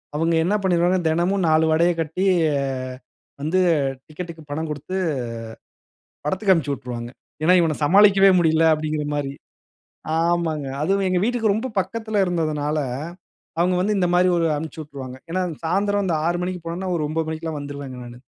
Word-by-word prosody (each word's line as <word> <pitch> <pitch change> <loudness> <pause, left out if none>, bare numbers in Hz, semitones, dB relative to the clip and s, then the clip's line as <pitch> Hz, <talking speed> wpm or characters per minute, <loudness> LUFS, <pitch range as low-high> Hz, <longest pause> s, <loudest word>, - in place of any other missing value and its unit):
அவுங்க 165 +2 +1
என்ன 200 +5 +1
பண்ணிருவாங்க 180 0 +3
தினமும் 175 +3 +1
4 155 +1 +4
வடையை 170 +2 +3
கட்டி 165 +4 -2 0.3
அ - - 0 0.9
வந்து 160 +6 +1 0.5
டிக்கெட்க்கு 165 +1 -8
பணம் 160 +3 -3
கொடுத்து, 150 +5 -5 1.3
படத்துக்கு 190 +6 +1
அனுப்பிச்சி 145 -5 0
உட்ருவாங்க. 120 -2 -6 0.3
ஏன்னா 175 +3 +5
இவன 165 -3 +2
சமாளிக்கவே 195 +4 +6
முடியல. 160 -1 +3
அப்டிங்கற 155 -1 -2
மாரி. 140 -2 -2 0.9
ஆமாங்க. 165 -3 0 0.2
அதுவும் 195 +4 +1
எங்க 185 -1 +1
வீட்டுக்கு 225 -2 +1
ரொம்ப 225 +5 -2
பக்கத்தில 220 0 -1
இருந்ததுனால 155 -4 -1 0.8
அவுங்க 180 +1 +2
வந்து 205 +3 +1
இந்த 180 - +2
மாரி 180 +1 +4
ஒரு 165 - +2
அனுப்ச்சு 160 +1 -6
விட்ருவாங்க. 135 -4 -8
ஏன்னா 185 +2 0 0.2
சாயந்திரம் 200 +2 +1
6 175 +1 0
மணிக்கு 180 -1 -4
போனோம்னா 180 +3 -3
ஒரு 155 -2 -1
9 160 +1 -2
மணிக்கெல்லாம் 160 -1 -4
வந்துருவேங்க 140 -2 -7
நானு. 120 +1 -12
165 Hz, 145 wpm, -22 LUFS, 155-185 Hz, 1.3 s, சமாளிக்கவே